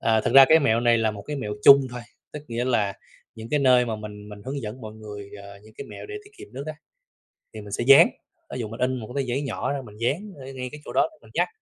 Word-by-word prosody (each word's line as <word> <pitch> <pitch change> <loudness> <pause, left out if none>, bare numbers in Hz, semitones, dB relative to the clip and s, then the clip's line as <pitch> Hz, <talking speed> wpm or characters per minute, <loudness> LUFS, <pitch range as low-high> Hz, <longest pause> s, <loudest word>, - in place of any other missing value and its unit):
à, 110 -1 +2
thực - - -2
ra 135 0 +11
cái 160 - +7
mẹo 115 -5 +2
này 120 -1 +3
là 110 -1 +1
một 105 -1 -9
cái 150 +5 -5
mẹo 105 -6 -4
chung 140 -1 +8
thôi, 125 0 -7 0.3
tức 150 - -7
nghĩa 120 +1 -2
là 110 -6 +1 0.4
những 110 0 -9
cái 150 - +1
nơi 125 -2 +4
mà 110 -2 -3
mình 105 -1 -9
mình 105 0 -11
hướng 135 +2 -4
dẫn 110 +4 -7
mọi 110 -2 -8
người, 105 -2 -10
ờ, 100 0 -12
những 110 0 -18
cái - - -6
mẹo - - -9
để 415 - -8
tiết 405 - -17
kiệm - - -11
nước 135 +2 -6
á, 155 - -5 0.8
thì 110 - -7
mình 105 -1 -11
sẽ - - -2
dán. 135 +1 +8 0.5
Thí - - -5
dụ 110 - -4
mình 115 +2 -9
in 130 +1 +1
1 110 -4 -7
cái 140 - 0
tờ - - -9
giấy 135 +4 -1
nhỏ 140 - -3
ra 140 - -3
mình 105 -1 -13
dán 160 - -2
ở 135 - -11
ngay 125 -1 -5
cái 150 - -9
chỗ - - -8
đó - - +3
đó 315 - -22
mình - - -18
nhắc, - - +1
120 Hz, 300 wpm, -24 LUFS, 110-140 Hz, 0.8 s, ra